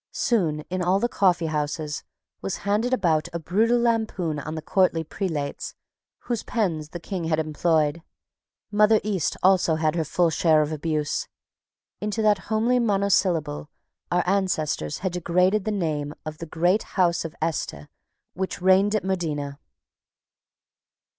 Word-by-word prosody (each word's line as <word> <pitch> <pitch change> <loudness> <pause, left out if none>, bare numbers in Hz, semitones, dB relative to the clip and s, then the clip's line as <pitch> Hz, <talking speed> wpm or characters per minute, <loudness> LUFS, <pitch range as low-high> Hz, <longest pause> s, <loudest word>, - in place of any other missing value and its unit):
Soon 170 - +1
in 185 +4 -4
all 180 +2 +2
the 240 - +1
coffeehouses 155 -7 0 0.4
was 195 - -3
handed 210 +5 +1
about 165 -11 +2
a - - -1
brutal 220 +9 +2
lampoon 220 -9 0
on 155 +2 -5
the 160 - -4
courtly 185 -4 +2
prelates 155 -4 -4 0.5
whose 240 -3 -2
pens 165 -9 -1
the 175 - -7
King 180 0 -4
had 160 -1 +1
employed. 155 0 +1 0.7
Mother 210 +1 +5
East 200 -6 0
had - - -15
also 185 -4 +4
her 160 +1 +1
full 165 +2 +1
share 160 -1 +4
of 150 - -4
abuse. 155 -1 -2 0.7
Into 210 +1 -2
that 210 -2 +4
homely 230 +3 +2
monosyllable 190 -9 +1 0.4
our 175 0 +2
ancestors 180 - 0
had 185 - +1
degraded 180 +3 +1
the 215 - 0
name 155 -7 -2
of 155 0 -6
the 165 - -6
great 175 +7 +2 0.2
house 175 -2 +3
of 165 0 -7
Este 150 - -3 0.5
which 190 +1 -3
reigned 190 +3 +4
at 215 - 0
Modena. 150 -7 -2
175 Hz, 140 wpm, -25 LUFS, 155-200 Hz, 0.7 s, Mother